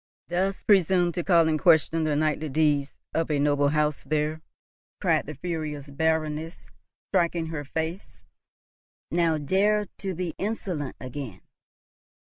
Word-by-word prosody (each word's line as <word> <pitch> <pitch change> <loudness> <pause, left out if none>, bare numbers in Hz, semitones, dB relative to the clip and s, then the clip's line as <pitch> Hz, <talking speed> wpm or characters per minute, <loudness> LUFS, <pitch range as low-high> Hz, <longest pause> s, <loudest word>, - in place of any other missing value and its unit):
dost 190 +3 -1
presume 185 -3 +4
to 175 +1 -3
call 170 -3 +4
in 155 -1 +1
question 165 -1 +4
the 150 -1 +1
knightly 155 0 0
deeds 145 -1 +1 0.2
of 165 0 0
a 150 - +1
noble 145 0 +2
house! 150 0 0
There!" 155 +2 -1 0.6
cried - - +1
the 155 - -6
furious 150 -3 -4
Baroness, 160 +2 -1 0.4
striking 170 -1 +1
her 155 -3 -4
face. 160 +6 -5 0.9
"Now! 165 -2 +2
dare 205 +8 +2
to 190 -2 -3
be 175 -2 -3
insolent 185 -9 -3
again." 130 -6 -7
160 Hz, 130 wpm, -26 LUFS, 150-175 Hz, 0.9 s, presume